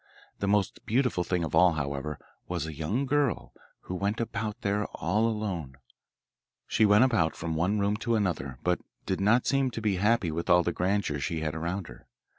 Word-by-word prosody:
The 100 - -1
most 100 -1 +1
beautiful 125 -6 +1
thing 90 -1 -1
of 80 - -4
all, 85 +1 +6
however, 70 0 -3 0.3
was - - -2
a 80 - -5
young 90 - -1
girl 140 -2 0 0.3
who - - -7
went 100 +4 -1
about 110 -1 -3
there, 100 0 0
all 105 +7 0
alone. 95 -12 -3 0.9
She 110 - +3
went 105 +3 +6
about 110 -11 +2
from 80 0 -3
one 90 +6 +1
room 100 +1 +1
to 115 +1 0
another, 80 - -1
but 90 0 +1 0.3
did 95 0 -1
not 115 +5 +4
seem 135 -1 +2
to 115 - -5
be 105 -4 0
happy 105 -2 +2
with 85 +3 -4
all 90 0 +6
the 85 - -1
grandeur 90 -5 0
she 80 +2 -2
had 75 -1 -2
about 85 +4 -3
her. - - -13
95 Hz, 195 wpm, -28 LUFS, 80-110 Hz, 0.9 s, all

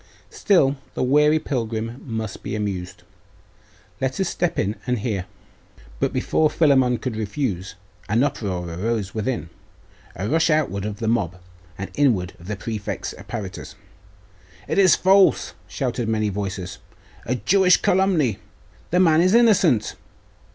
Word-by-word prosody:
Still 145 -9 +3 0.2
the - - 0
weary 150 +4 +4
pilgrim 115 -4 -3
must 110 -4 -5
be - - -4
amused. 95 -3 -4 1.0
Let 130 0 -1
us 190 - +1
step 175 -1 -1
in 100 +4 -1
and 125 0 +1
hear.' 100 -4 -3 0.7
But - - +1
before 155 -1 +1
Philammon 130 -6 +3
could 125 -2 -4
refuse, 105 -3 -3 0.3
an 115 +5 +3
uproar 100 -11 -2
arose 100 +4 -2
within, 110 -5 -3 0.6
a 95 +3 -3
rush 160 +7 +2
outward 145 -11 +1
of 105 -1 -4
the 110 - -3
mob, 95 -6 0 0.4
and 100 - -6
inward 110 -11 +1
of 85 - -13
the 105 - -3
prefect's 105 +1 -5
apparitors. 95 -3 -7 0.9
'It - - 0
is 190 -3 +6
false!' 190 - +4
shouted 120 0 -2
many 110 -1 +1
voices. 95 -2 -5 0.5
'A 125 - +1
Jewish 185 +6 +4
calumny! 180 - +2 0.5
The 180 - +2
man 165 -3 +5
is 185 +4 +4
innocent! 195 - +4
115 Hz, 135 wpm, -22 LUFS, 100-150 Hz, 1.0 s, is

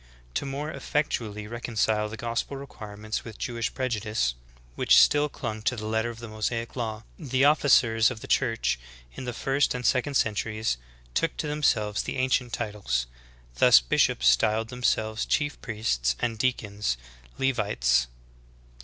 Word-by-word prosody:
"^; - - -26
4. - - -25 0.3
To - - -1
more 145 +3 -4
effectually 110 -11 -2
reconcile 110 -1 -1
the 110 - -7
gospel 115 +4 -3
requirements 110 -5 -6
with 110 -3 -9
Jewish 115 -1 -2
prejudice, 110 - -1 0.4
which - - +4
still 150 0 +5
clung 110 -5 -5
to 120 +3 0
the 110 -2 -6
letter 110 +2 0
of 120 - -8
the 115 0 -8
IMosaic 115 +2 -3
law, 110 -3 -3 0.2
the 135 -3 +1
officers 125 -7 +5
of 120 -3 -6
the - - -8
Church 115 - +1 0.3
in 130 - -7
the 125 - -2
first 135 +3 +1
and 125 -1 -4
sec 130 +1 +2
ond 140 -2 +1
centuries 110 - 0 0.4
took 165 - 0
to - - -2
themselves 115 -9 +1
the - - -4
ancient 130 -1 +1
titles; 105 - -2 0.5
thus, - - +8
bishops - - +2
styled 110 - +3
themselves 115 -3 0
chief 145 -1 -1
priests, 65 - 0
and 115 -2 -2
deacons, 105 - -1 0.4
Levites. 100 - +2
115 Hz, 155 wpm, -27 LUFS, 105-130 Hz, 0.5 s, thus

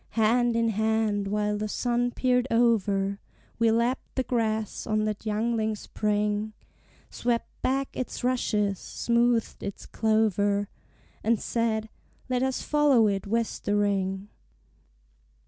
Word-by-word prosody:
Hand 235 +2 +3
in 230 0 +2
hand, 220 -1 0
while 210 0 0
the 215 - -2
sun 245 +2 0
peered 250 0 +1
over, 205 -4 +2 0.4
We 230 -1 +4
lapped 235 +3 0
the 260 - +1
grass 220 -4 -1
on 215 -1 +1
that 215 +1 -3
youngling 220 0 0
spring, 210 0 -1 0.6
Swept 235 -1 -1
back 270 +1 -1
its 255 - -4
rushes, 210 -6 0
smoothed 235 -1 0
its 200 - -6
clover, 205 -2 +1 0.5
And 225 0 +2
said, 220 -2 -1 0.4
"Let 250 -1 +1
us 265 0 -1
follow 290 -6 +4
it 195 -1 -1
westering." 205 -3 0
220 Hz, 115 wpm, -27 LUFS, 210-235 Hz, 0.6 s, We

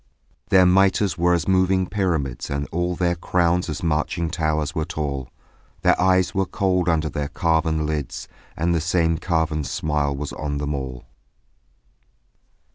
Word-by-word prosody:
Their 95 -3 +6
mitres 95 0 +3
were 90 +1 +3
as 85 - -2
moving 95 0 +3
pyramids 85 -11 -2
And 70 +1 -2
all 90 +1 -1
their 85 0 +1
crowns 85 0 0
as 75 - -4
marching 80 +1 -1
towers 80 -2 -1
were 80 - -1
tall; 70 -6 -4 0.5
Their - - +3
eyes 95 -1 +3
were 95 -1 0
cold 90 -2 0
under 80 -1 +1
their 75 0 -3
carven 80 -1 0
lids 75 -3 -4 0.3
And 85 +2 +1
the 85 - +1
same 80 -1 +1
carven 80 -3 0
smile 75 +1 -1
was 70 +1 -5
on 75 -1 -3
them 75 +1 -2
all. 65 -3 -5
80 Hz, 150 wpm, -22 LUFS, 75-90 Hz, 0.5 s, Their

